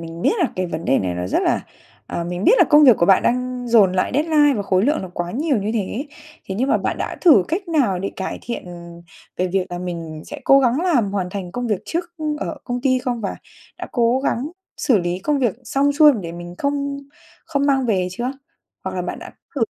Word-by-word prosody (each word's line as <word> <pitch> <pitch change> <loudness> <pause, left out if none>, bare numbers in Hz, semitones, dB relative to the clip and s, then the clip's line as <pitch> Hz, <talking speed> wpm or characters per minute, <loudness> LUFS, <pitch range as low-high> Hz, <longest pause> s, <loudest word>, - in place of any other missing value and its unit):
mình 165 +1 -8
biết - - +3
là 340 -7 +2
cái 185 -1 -1
vấn 165 0 -5
đề 135 - +3
này 90 -2 -2
nó 90 0 -3
rất - - 0
là - - +1 0.5
ờ, 170 - -4
mình 180 +2 -4
biết - - +6
là - - +7
công 300 0 +7
việc 250 -6 +7
của 170 - +2
bạn 195 - +5
đang 250 0 -1
dồn 210 -6 +5
lại 185 - 0
deadline 295 -1 +3
và 205 - -1
khối 190 -1 +1
lượng 295 -1 +1
là 190 - -6
quá 175 0 -3
nhiều 280 - 0
như 205 +1 -1
thế, 225 +7 -2 0.4
thế 190 - -3
nhưng 255 +6 0
mà - - +3
bạn - - -2
đã - - -4
thử 290 - +6
cách 350 +3 -3
nào 250 - +1
để 195 - -3
cải 190 - -4
thiện 235 - -5 0.7
về 185 - 0
việc 190 0 0
là 175 - -4
mình 165 -3 -6
sẽ 295 - -8
cố 275 - +6
gắng 255 +4 +2
làm 245 - +2
hoàn 185 -3 -2
thành 185 -3 -6
công 245 +2 -3
việc 210 -4 -1
trước, 340 +1 -2
ưm, 305 -1 -2
ở - - -4
công 245 -1 -3
ty 255 -1 +2
không, 245 -2 -3
và 200 - -3 0.4
đã - - -5
cố 240 +1 +2
gắng 245 +4 0 0.3
xử 235 -7 +2
lý 175 +1 -2
công 290 +9 0
việc 240 -7 +1
xong 275 +4 +1
xuôi 300 0 +7
để 165 - -6
mình 175 0 -8
không 280 0 -1 0.5
không 280 0 -1
mang 270 -2 +2
về 185 -5 +1
chưa? 240 +7 -3 0.5
Hoặc - - -4
là - - -1
bạn - - -5
đã - - -9 0.2
thử 255 - +2
235 Hz, 245 wpm, -21 LUFS, 185-280 Hz, 0.7 s, là